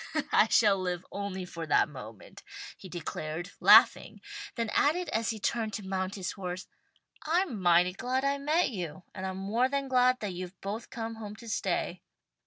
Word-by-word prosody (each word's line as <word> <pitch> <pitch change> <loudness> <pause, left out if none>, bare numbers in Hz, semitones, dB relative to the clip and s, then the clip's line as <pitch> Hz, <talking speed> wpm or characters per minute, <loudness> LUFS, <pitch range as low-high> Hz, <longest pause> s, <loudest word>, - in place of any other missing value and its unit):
"I 215 - +5
shall 205 -3 +4
live 180 -1 -3
only 200 -2 -4
for 165 -2 -7
that - - +4
moment," 115 -7 -11 0.3
he 190 - -12
declared, 165 +1 -5
laughing, - - +6 0.4
then 230 -3 -2
added 345 +5 +2
as 225 0 0
he 220 - -3
turned 220 +1 -1
to 205 -1 -5
mount 190 0 -2
his 185 -3 -3
horse, 185 -1 -5 0.6
"I'm 320 - 0
mighty 175 0 +4
glad 255 +6 -1
I 280 0 +1
met 300 +2 +2
you, 180 -4 -6
and 190 0 -4
I'm 190 0 -4
more 220 +7 +1
than 275 0 -1
glad 255 0 +3
that 205 -3 -3
you've 180 +1 -7
both 210 +4 -5
come 225 -2 -5
home 210 -2 -7
to 230 - -12
stay." 215 - -2
200 Hz, 180 wpm, -30 LUFS, 180-240 Hz, 0.6 s, laughing